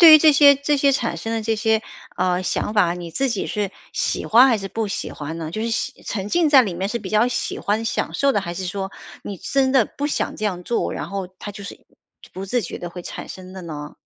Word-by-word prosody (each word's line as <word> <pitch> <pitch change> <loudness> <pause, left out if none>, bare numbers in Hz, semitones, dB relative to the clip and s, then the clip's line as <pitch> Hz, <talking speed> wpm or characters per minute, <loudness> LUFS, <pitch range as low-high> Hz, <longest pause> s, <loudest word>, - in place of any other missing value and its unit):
对 330 -3 +11
于 310 - +10
这 310 0 +6
些 285 0 +8
这 285 +2 0
些 280 0 +3
产 245 -3 -1
生 225 - -4
的 225 -1 -1
这 220 0 0
些， 220 0 +2 0.3
呃， 180 0 +1
想 210 - -1
法， 180 -5 +3
你 175 -1 -7
自 270 +11 0
己 220 -5 -2
是 205 -2 -2 0.2
喜 - - -1
欢 245 +4 +7
还 230 - +3
是 195 -1 -5
不 220 0 -2
喜 195 - -4
欢 155 +3 -6
呢？ 160 -1 -5
就 215 - -4
是 230 - -1
喜 225 - -3
沉 200 -1 -3
浸 340 +1 +3
在 270 -3 +7
里 195 -5 -3
面 190 +3 -2
是 235 +3 -2
比 190 -3 -7
较 215 +3 +3
喜 245 - -3
欢、 215 +3 -1
享 - - -2
受 280 0 +3
的， 205 - +1
还 175 -2 -5
是 190 - -4
说 195 +1 -4 0.3
你 200 - -6
真 265 +6 +1
的 255 -5 +5
不 285 +7 -4
想 295 - -2
这 215 - -4
样 180 -3 -3
做， 235 - -1
然 - - -5
后 195 -2 -3
它 205 - -7
就 200 0 -9
是， - - -7
嗯， - - -27 0.5
不 190 +1 -6
自 240 +3 0
觉 - - -6
地 175 - -5
会 175 +1 -8
产 - - -7
生 185 0 -9
的 190 - -8
呢？ 150 -3 -7
210 Hz, 290 characters per minute, -22 LUFS, 185-250 Hz, 0.5 s, 对